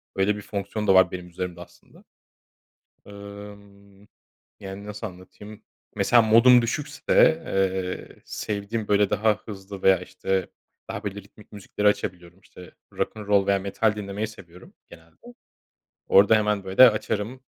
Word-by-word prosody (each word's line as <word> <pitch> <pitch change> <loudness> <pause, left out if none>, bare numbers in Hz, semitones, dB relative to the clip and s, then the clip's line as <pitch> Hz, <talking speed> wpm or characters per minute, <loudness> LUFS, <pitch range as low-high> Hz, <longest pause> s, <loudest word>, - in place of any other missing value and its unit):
Öyle 100 +2 +1
bir 105 - -7
fonksiyon 100 +1 -5
da 95 - +5
var 95 0 +5
benim 90 -1 -7
üzerimde 90 0 -6
aslında. 90 - -17 1.0
Emm, 100 -1 -13 0.6
yani, 95 +1 -9
nasıl 105 +1 -6
anlatayım, 105 +3 -13 0.3
mesela 120 - +4
modum 115 +3 +6
düşükse, 150 +4 +1
eee, 95 -3 -3
sevdiğim, 105 +1 -4
böyle, 100 -1 +2
daha 110 +1 +2
hızlı 100 -2 -9
veya 95 -1 +5
işte 95 +1 -3 0.4
daha, - - -6
böyle, 100 -1 -4
ritmik 105 - -20
müzikleri 105 0 -3
açabiliyorum, 90 -3 -2
işte 90 -2 -15 0.2
rock'n 110 - -3
roll 100 -1 +3
veya 100 0 +2
metal 100 +3 -1
dinlemeyi 105 +1 -4
seviyorum 90 -4 -15 0.2
genelde. 80 0 -17 0.9
Orada 100 +3 +6
hemen 105 -2 0
böyle 95 +7 +7
açarım, 115 +4 -4
100 Hz, 135 wpm, -24 LUFS, 95-105 Hz, 1.0 s, böyle